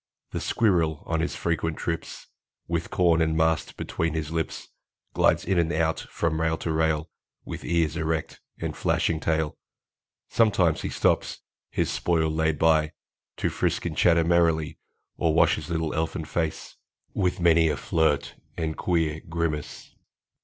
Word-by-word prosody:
The - - -3
squirrel, 85 -9 +1
on 80 0 -1
his 85 - -1
frequent 80 -1 -1
trips 80 -1 -4 0.4
With 85 0 -2
corn 85 -2 +3
and 80 -1 +1
mast 80 0 +1
between 80 -1 -2
his 80 -1 -3
lips, 80 -1 -3 0.4
Glides - - +3
in 95 -1 +2
and 85 -1 +1
out 80 0 +1
from 80 -1 -2
rail 80 0 +1
to 80 - -3
rail, 80 0 0 0.3
With - - -6
ears 85 -2 +1
erect 80 -1 -2 0.2
and - - -3
flashing 80 -2 +1
tail. 80 -1 -1 0.7
Sometimes 100 -8 +2
he - - -3
stops, - - 0 0.3
his - - -1
spoil 80 -2 +1
laid 80 0 +1
by, 80 -1 +3 0.4
To - - 0
frisk - - -1
and - - -2
chatter 85 -1 +4
merrily, 80 -2 +2 0.4
Or 80 -2 +1
wash - - +5
his - - -7
little 80 -2 -1
elfin 80 0 -2
face, 80 0 -3 0.4
With 90 -1 0
many 85 -2 +4
a 75 - -1
flirt 80 -3 +1 0.2
and 80 -1 -2
queer 80 -3 0
grimace. 80 -3 -3
80 Hz, 155 wpm, -26 LUFS, 80-85 Hz, 0.7 s, wash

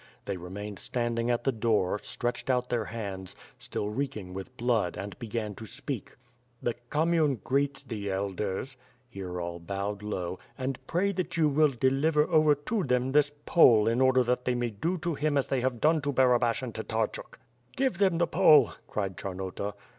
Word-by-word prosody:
They 100 - -2
remained 95 +3 -7
standing 120 -1 -1
at 120 -1 +1
the 135 - +2
door, 110 -4 +1
stretched 120 +2 -3
out 125 -1 +1
their 115 -3 0
hands, 100 -5 -6 0.2
still 105 - -3
reeking 110 -6 -4
with 95 +7 -8
blood 115 -7 +1
and 100 +1 -6
began 110 -2 -3
to 110 +3 -9
speak: 135 -2 -6 0.4
"The 120 - -1 0.2
commune 155 -2 +2
greets 140 +1 0
the 105 -6 -5
elders" 100 +6 -3 0.2
— 125 0 -37
here 90 -3 -5
all 85 0 -4
bowed 100 +3 -4
low, 95 -4 -4 0.2
"and 130 -1 -3
pray 190 +4 +1
that 185 -2 -3
you 160 -2 +4
will 150 +1 +4
deliver 140 +4 +2
over 155 -2 +5
to 190 +9 -2
them 125 -2 +1
this 145 0 +4
Pole 115 -10 +6
in 115 +3 +2
order 130 -1 +5
that 125 +1 0
they 125 - +1
may 120 -1 -1
do 165 - -1
to 170 0 -2
him 145 0 0
as 140 - 0
they 135 -2 +1
have 125 -2 -1
done 155 +3 +3
to 145 +1 -1
Barabash 125 -2 +3
and 120 -3 -5
Tatarchuk." 110 0 -3 0.4
"Give 260 -8 0
them 190 -4 +3
the 170 - +3
Pole,'* 155 - +6 0.2
cried 95 -3 -3
Charnota. 95 +2 -4
120 Hz, 185 wpm, -29 LUFS, 105-140 Hz, 0.4 s, Pole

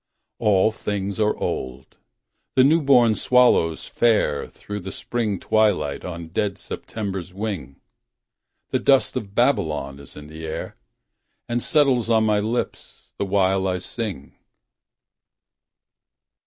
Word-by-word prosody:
All 105 -2 +3
things 100 -1 -4
are 105 0 +2
old. 65 -1 -5 0.6
The 130 - +6
new 160 +5 +4
born 125 -5 +5
swallows 120 -10 +3
fare 110 -11 +1
Through 105 0 -7
the 95 0 -7
Spring 110 -4 -2
twilight 105 -10 +1
on 85 -2 -7
dead 100 +3 -1
September's 95 -2 -5
wing. 95 - -5 0.9
The - - +1
dust - - +3
of 100 -1 -5
Babylon 80 - 0
is 70 - -10
in 75 - -9
the 80 +1 -8
air. 80 - -5 0.7
And 120 0 -1
settles 135 -6 +2
on 110 -1 +4
my 105 -1 +2
lips 110 +4 -4
the - - 0
while 95 0 +2
I 90 -1 0
sing. 95 - -5
100 Hz, 125 wpm, -23 LUFS, 90-115 Hz, 0.9 s, The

